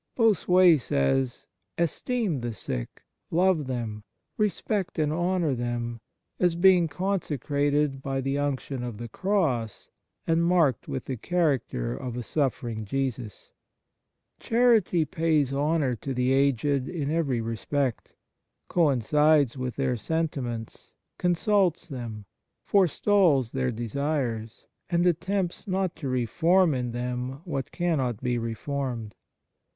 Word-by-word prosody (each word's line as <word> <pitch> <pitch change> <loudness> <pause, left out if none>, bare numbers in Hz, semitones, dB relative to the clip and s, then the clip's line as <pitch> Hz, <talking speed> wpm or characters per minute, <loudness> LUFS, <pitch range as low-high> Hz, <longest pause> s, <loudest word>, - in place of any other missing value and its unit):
Bossuet 185 - +5
says: 120 - 0 0.2
" 100 - -53
Esteem 215 - -2
the 120 -1 -3
sick, 60 -10 -6 0.3
love 175 -4 +2
them, 115 -5 -4 0.3
respect 210 -2 -1
and 155 -1 +1
honour 175 -2 +1
them, 120 -1 -3 0.4
as 175 -2 +2
being 180 -1 +5
consecrated 145 -5 -1
by 135 0 -2
the 135 +1 -1
unction 140 -2 -2
of 120 -4 -5
the 120 +1 -6
Cross 140 - -1 0.3
and 165 +1 +2
marked 170 -8 +2
with 130 - -4
the 130 - -4
character 135 - 0
of 120 - -5
a 125 - -3
suffering 120 -6 -2
Jesus." 125 -2 -4 0.9
Charity 225 -8 +3
pays 155 -5 +1
honour 145 -2 +1
to 135 +4 -5
the 125 +1 +2
aged 140 0 +2
in 150 -5 -2
every 150 -7 0
respect, 115 +3 -2 0.5
coincides 150 -2 +3
with 125 -2 -4
their 130 -2 0
sentiments, 125 -4 -3 0.3
consults 180 0 +2
them, 115 -7 -7 0.4
forestalls 180 - +3
their 130 -1 0
desires, 120 -1 -3 0.2
and 175 0 +2
attempts 180 +3 -1
not 190 -2 -1
to 140 - -4
reform 165 +8 +3
in 125 -2 -2
them 125 +3 -4
what 140 -6 -4
cannot 140 - 0
be 125 -1 0
reformed. 115 -1 -4
140 Hz, 120 wpm, -27 LUFS, 120-170 Hz, 0.9 s, Bossuet